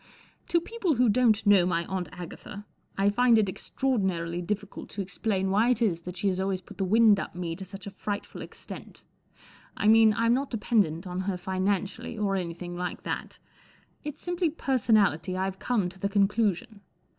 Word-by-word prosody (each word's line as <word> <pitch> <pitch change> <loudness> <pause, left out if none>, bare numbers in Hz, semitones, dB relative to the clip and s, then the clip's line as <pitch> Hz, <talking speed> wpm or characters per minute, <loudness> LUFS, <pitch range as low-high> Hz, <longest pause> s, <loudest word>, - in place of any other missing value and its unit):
T 340 - +2
O - - +5
people 380 -4 -1
who 245 -1 +4
don't 220 -1 +3
know 200 -3 +6
my 170 -1 0
Aunt 185 -3 -3
Agatha 180 +3 -9 0.3
I 200 +1 +3
find 240 +1 +4
it 215 -2 +3
extraordinarily 185 -6 -1
difficult 205 +3 -4
to 205 - -4
explain 190 0 -1
why 215 +5 +3
it 250 - +2
is 190 -8 +1
that 180 +1 -8
she 200 - 0
has 185 -1 -2
always 190 -1 0
put 200 +2 -14
the - - +1
wind 215 +1 +5
up - - -6
me 170 -2 -3
to 190 - -7
such 195 +2 -9
a 200 - -6
frightful 205 +1 -5
ex¬ - - -10
tent. - - -10 0.7
I 210 - +1
mean* 220 -1 +6
I'm 230 +1 +3
not 270 +2 0
dependent 205 -7 +1
on 180 0 -4
her 185 - -1
finan¬ 190 +2 0
cially* 225 +3 -7
or 200 -2 +1
anything 175 -1 -4
like 180 0 -4
that* - - -4 0.7
It's 300 -1 -7
simply 350 -1 0
per¬ 275 -4 -1
sonality* 185 -6 +2
I 190 +1 0
Ve 190 - -17
come 225 -7 0
to 190 +1 -15
the 200 - -1
conclusion. 205 +1 +1
200 Hz, 200 wpm, -28 LUFS, 185-225 Hz, 0.7 s, know